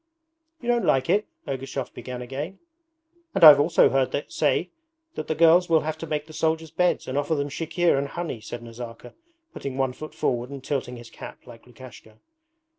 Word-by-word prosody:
'You 240 Hz, -, -9 dB
don't 240 Hz, -1 st, +2 dB
like 135 Hz, +5 st, +2 dB
it?' 210 Hz, +3 st, +2 dB, 0.2 s
Ergushov 135 Hz, 0 st, -4 dB
began 125 Hz, -1 st, -7 dB
again. 145 Hz, +9 st, -6 dB, 0.8 s
'And 185 Hz, -, +1 dB
I've 150 Hz, -3 st, +11 dB
also 160 Hz, +3 st, +4 dB
heard 135 Hz, +2 st, 0 dB
say 160 Hz, +4 st, 0 dB, 0.4 s
that -, -, -5 dB
the 155 Hz, -, -1 dB
girls 170 Hz, +2 st, +5 dB
will 160 Hz, -2 st, +4 dB
have 155 Hz, 0 st, -3 dB
to 165 Hz, -, -6 dB
make 150 Hz, -1 st, -2 dB
the 155 Hz, -, -13 dB
soldiers' 160 Hz, 0 st, -1 dB
beds 180 Hz, +2 st, +1 dB
and 130 Hz, +2 st, -1 dB
offer 160 Hz, +2 st, 0 dB
them 145 Hz, 0 st, -2 dB
chikhir 165 Hz, 0 st, +1 dB
and 140 Hz, -, -2 dB
honey,' 160 Hz, -7 st, -5 dB
said 120 Hz, +2 st, -7 dB
Nazarka, 115 Hz, 0 st, -9 dB, 0.4 s
putting 135 Hz, -1 st, -6 dB
one 135 Hz, -1 st, 0 dB
foot 155 Hz, +4 st, -9 dB
forward 120 Hz, 0 st, -1 dB
and 140 Hz, -2 st, -8 dB
tilting 125 Hz, -4 st, -3 dB
his 120 Hz, -1 st, -12 dB
cap -, -, -11 dB
like 120 Hz, -1 st, -14 dB
Lukashka. 120 Hz, -3 st, -14 dB
140 Hz, 190 wpm, -25 LUFS, 125-160 Hz, 0.8 s, I've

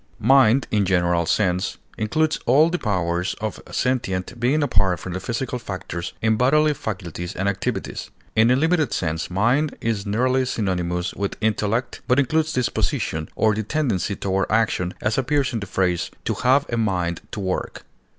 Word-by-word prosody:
Mind, 130 Hz, +1 st, +5 dB
in 105 Hz, -, +2 dB
a -, -, +1 dB
general 85 Hz, -2 st, +2 dB
sense, 90 Hz, -2 st, +1 dB, 0.2 s
includes 155 Hz, +9 st, 0 dB
all 150 Hz, +7 st, +5 dB
the 180 Hz, -, -1 dB
powers 90 Hz, -4 st, -1 dB
of 110 Hz, -1 st, -4 dB
sentient 120 Hz, -3 st, -1 dB
being 135 Hz, +6 st, +2 dB
apart 95 Hz, -, +2 dB
from 90 Hz, -, -6 dB
the 95 Hz, -, -3 dB
physical 125 Hz, +4 st, -3 dB
factors 95 Hz, -5 st, -5 dB
in 110 Hz, -1 st, +3 dB
bodily 150 Hz, +5 st, +4 dB
faculties 95 Hz, -, -5 dB
and 95 Hz, -, -1 dB
activities; 100 Hz, -1 st, -3 dB, 0.3 s
in 110 Hz, +2 st, +5 dB
a 125 Hz, -, +5 dB
limited 155 Hz, -1 st, +2 dB
sense, 80 Hz, -1 st, -2 dB
mind 120 Hz, +11 st, +1 dB
is 110 Hz, -3 st, -1 dB
nearly 130 Hz, +5 st, +2 dB
synonymous 90 Hz, -7 st, -1 dB
with 100 Hz, 0 st, -3 dB
intellect, 110 Hz, +2 st, -1 dB
but 125 Hz, -, +3 dB
includes 155 Hz, +3 st, +2 dB
disposition, 110 Hz, -, -1 dB
or 110 Hz, -1 st, +3 dB
the 110 Hz, -, -1 dB
tendency 110 Hz, -, -1 dB
toward 95 Hz, -1 st, -1 dB
action, 110 Hz, -5 st, +1 dB
as 105 Hz, +4 st, +1 dB
appears 135 Hz, 0 st, +1 dB
in 115 Hz, -, -1 dB
the 100 Hz, -, -6 dB
phrase 90 Hz, -2 st, 0 dB, 0.2 s
"to -, -, 0 dB
have 130 Hz, +4 st, +3 dB
a -, -, +1 dB
mind 90 Hz, -6 st, 0 dB
to -, -, -5 dB
work." 95 Hz, -2 st, -3 dB
110 Hz, 170 wpm, -23 LUFS, 95-130 Hz, 0.3 s, Mind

